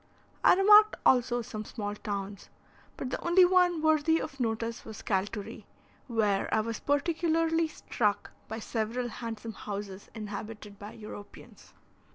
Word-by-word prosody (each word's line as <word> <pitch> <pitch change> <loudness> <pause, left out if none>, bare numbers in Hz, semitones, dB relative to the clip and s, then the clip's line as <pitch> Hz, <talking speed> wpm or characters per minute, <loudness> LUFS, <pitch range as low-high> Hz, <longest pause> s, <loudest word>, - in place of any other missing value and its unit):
I - - +7
remarked 420 +3 +7
also 245 -1 +3
some 215 -1 -6
small 205 -1 -5
towns, 200 -1 -5 0.5
but 255 - -4
the - - -4
only 355 +2 +6
one 355 -3 +3
worthy 315 +1 +3
of 275 - -6
notice 230 0 -2
was 220 -2 -9
Calturi, 200 +1 -3 0.4
where 210 -5 +1
I 220 - +3
was 230 0 -4
particularly 325 +2 +1
struck 210 -8 -2 0.2
by 220 - -5
several 230 +2 -2
handsome 225 -1 -6
houses 200 -2 -7
inhabited 210 -1 -7
by 205 +1 -9
Europeans. 210 -2 -12
230 Hz, 135 wpm, -29 LUFS, 210-315 Hz, 0.5 s, I